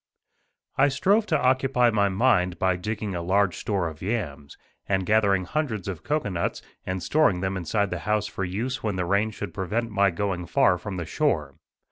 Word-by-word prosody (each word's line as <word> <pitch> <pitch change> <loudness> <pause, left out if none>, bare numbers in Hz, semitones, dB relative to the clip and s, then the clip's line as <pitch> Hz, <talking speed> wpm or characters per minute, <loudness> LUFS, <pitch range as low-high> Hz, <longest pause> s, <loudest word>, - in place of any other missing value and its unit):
* - - -47
I - - +6
strove 200 +10 +2
to 155 -6 +2
occupy 130 -2 +3
my 100 -2 +2
mind 95 -4 +2
by 95 -1 +2
digging 105 +2 -4
a 85 - -3
large 95 +1 +1
store 95 -5 -1
of 80 -1 -9
yams, 85 -10 -4 0.3
and 95 -1 +1
gathering 100 -2 +3
hundreds 115 - -2
of 90 -5 -5
cocoanuts, 100 - -2 0.2
and 95 -1 -3
storing 145 - +2
them 95 0 -1
inside 95 +3 -1
the 90 - -2
house 105 0 +2
for 95 - -4
use 115 +8 -3
when 105 -3 -2
the 90 -1 -1
rain 100 +4 +2
should 105 -4 -7
prevent 110 +6 -2
my 100 -1 +3
going 90 -1 -3
far 90 - +3
from 95 +1 -6
the 85 - -3
shore. 80 - 0
100 Hz, 190 wpm, -25 LUFS, 90-115 Hz, 0.3 s, I